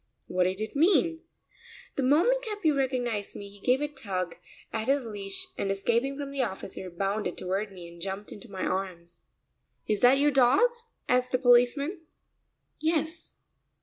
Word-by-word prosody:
What 180 0 +1
did 185 +2 -1
it 220 - -4
mean? 330 +1 +3 0.8
The - - 0
moment 335 - +4
Capi 415 -8 0
recognized 250 -7 -1
me 200 0 -8
he 205 - -15
gave 250 +6 +2
a 295 - +1
tug 190 - -4 0.4
at 220 +1 -2
his 275 -1 +2
leash 200 -3 -3
and 195 - 0
escaping 235 +7 0
from 285 -1 -5
the 275 -1 -1
officer 190 -4 -4
bounded 195 +1 -2
toward 195 +3 -2
me 180 -3 -10
and 170 0 -13
jumped 195 +2 -4
into 210 +3 -9
my 190 -2 -3
arms. 175 -3 -4 0.6
"Is 210 -1 +1
that 250 +4 +6
your 290 +1 +4
dog?" 275 - +5 0.4
asked 250 0 +2
the - - +5
policeman. 255 +7 +3 0.8
"Yes." 320 +1 -1
240 Hz, 160 wpm, -28 LUFS, 195-280 Hz, 0.8 s, that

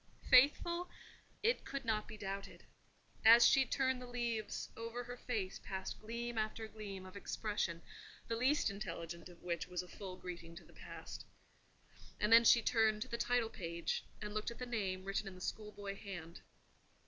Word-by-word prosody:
Faithful? 340 +7 +5 0.5
It 465 +3 +3
could 275 -2 -5
not 215 -2 0
be 215 - -8
doubted. 195 0 -5 0.6
As 230 +2 +10
she 270 -1 +6
turned 260 0 +1
the 250 - -7
leaves, 235 -3 -2
over 230 +2 -4
her 245 +1 -6
face 220 -6 -3
passed 190 -1 -4
gleam 235 +1 -3
after 215 +1 -2
gleam 200 -4 -7
of 185 +1 -11
expression, 200 -4 -2 0.4
the 230 - 0
least 255 -1 +3
intelligent 170 -3 -6
of 175 -1 -16
which 170 -1 -2
was 180 0 -3
a - - -12
full 185 0 -7
greeting 170 -2 -7
to 170 - -10
the - - -18
Past. - - -8 1.0
And 210 +2 +4
then 230 0 +9
she 235 0 +7
turned 220 -2 +3
to - - -13
the 235 - -2
title 245 -2 +2
page, 170 -1 -2 0.2
and 210 0 -4
looked 215 +1 -1
at 235 - -8
the 250 - -4
name 195 -6 -2
written 195 +1 -1
in 190 - -7
the - - -11
schoolboy 205 0 -5
hand. 175 -5 -8
215 Hz, 175 wpm, -37 LUFS, 190-235 Hz, 1.0 s, As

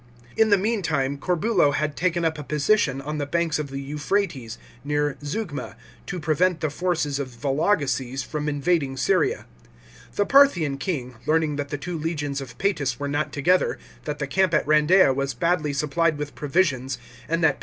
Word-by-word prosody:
In 220 -1 +4
the 205 - +6
meantime, 160 -10 0
Corbulo 180 -3 +2
had 155 -1 -1
taken 170 -1 0
up 160 -1 0
a - - -5
position 150 -1 +1
on 150 +2 -4
the 145 - -2
banks 170 0 0
of 150 -2 -4
the 135 0 -5
Euphrates, 145 - -2 0.3
near 145 0 0
Zeugma, 150 0 -4 0.3
to 180 - -4
prevent 165 +3 +1
the 155 - -1
forces 160 -4 -1
of 135 -2 -3
Vologeses 135 0 0
from 150 0 -3
invading 145 -2 0
Syria. 185 +4 +1 0.7
The 205 - +2
Parthian 175 - +4
king, 130 -8 -3
learning 155 -2 +2
that 145 -1 -3
the 145 - -3
two 170 +3 -5
legions 150 -3 -2
of 130 -3 -9
Paetus 145 -11 0
were 145 - -2
not 145 +2 -1
together, 180 +6 +2 0.3
that 150 -1 -3
the 145 - -2
camp 185 +4 +2
at 150 - +2
Randeia 155 +1 +5
was 140 +1 -2
badly 170 -3 +1
supplied 155 +2 +1
with 145 -1 -5
provisions, 135 -5 0 0.3
and 165 +1 0
that 150 -3 +4
Pa? - - -24
150 Hz, 175 wpm, -24 LUFS, 140-175 Hz, 0.7 s, the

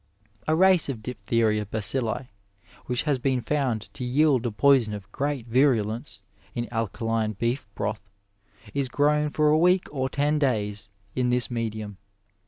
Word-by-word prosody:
A 155 - +3
race 185 -3 +5
of 115 -5 -5
diphtheria 110 -1 0
bacilli, 115 +4 -1 0.6
which 125 -1 0
has 145 -4 0
been 130 0 +1
found 125 -3 -2
to - - -6
yield 130 -1 +2
a - - -2
poison 115 0 +3
of 100 -1 -10
great 140 -2 -2
virulence 115 -4 +1 0.3
in 120 -1 -2
alkaline 115 0 -1
beef 120 +4 -2
broth, 105 -1 -4 0.6
is 140 -2 -1
grown 150 +2 +2
for 150 0 +2
a 155 - +4
week 180 +2 +4
or 130 -2 -1
ten 145 +3 +1
days 105 -6 -1 0.3
in 125 -1 +1
this 125 0 +1
medium. 110 -4 -4
125 Hz, 150 wpm, -26 LUFS, 110-140 Hz, 0.6 s, race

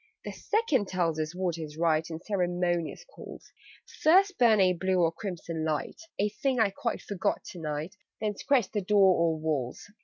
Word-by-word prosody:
"The - - -4
Second 310 - 0
tells 170 -4 -1
us 155 +2 -3
what 180 -3 -2
is 155 -1 -7
right 160 -1 +1
In 160 -1 -5
ceremonious 175 - -1
calls: - - -12 0.5
'First 385 +5 +4
burn 225 -4 +5
a 185 -1 +4
blue 185 +1 0
or 165 -2 +3
crimson 165 -3 -5
light' 155 - -3 0.2
(A 205 +1 +1
thing 250 +4 -1
I 215 -3 +3
quite 230 +4 -3
forgot 200 -4 -2
to 180 - -10
night), 155 +4 -4 0.2
'_Then 210 -1 -2
scratch 245 -4 +1
the 210 - -1
door 195 -1 +4
or 165 -1 +1
walls. 155 +2 -3
180 Hz, 180 wpm, -28 LUFS, 160-210 Hz, 0.5 s, burn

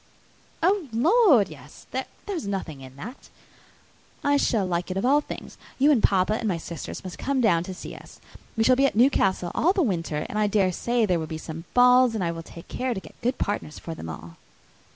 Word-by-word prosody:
"Oh, 375 -2 +2
Lord! 300 - +5
yes; - - -13
there - - -2 0.2
is 340 - -3
nothing 175 -8 -4
in 130 0 -12
that. 220 - -10 0.9
I 285 0 +3
shall 225 -7 +2
like 175 0 -2
it 185 - -3
of 195 - 0
all 285 +3 +4
things. - - -9 0.2
You 285 +3 +5
and 255 -7 +3
papa, 195 +1 +3
and 220 +1 -2
my 185 -5 0
sisters, 165 +2 -7
must 180 -4 -8
come 275 -1 0
down 175 -8 +3
and 185 -1 -6
see - - -8
us. - - -14 0.4
We 225 - +3
shall 255 +2 +5
be 275 +2 +4
at - - -3
Newcastle 195 -7 +3
all 355 +4 +3
the 385 -3 +2
winter, 165 - -1
and 210 - -3
I 210 - +3
dare 195 -2 +2
say 235 +5 0
there 180 -4 +1
will 160 - -4
be 160 - -5
some 160 +1 -8
balls, 250 -1 +6
and 205 - -1
I 170 - 0
will 165 0 -6
take 165 0 -12
care 255 -2 -2
to - - -3
get - - -16
good 245 +2 0
partners 200 -7 -3
for 165 - -6
them 80 - -8
all." 85 +1 -9
210 Hz, 225 wpm, -25 LUFS, 170-255 Hz, 0.9 s, balls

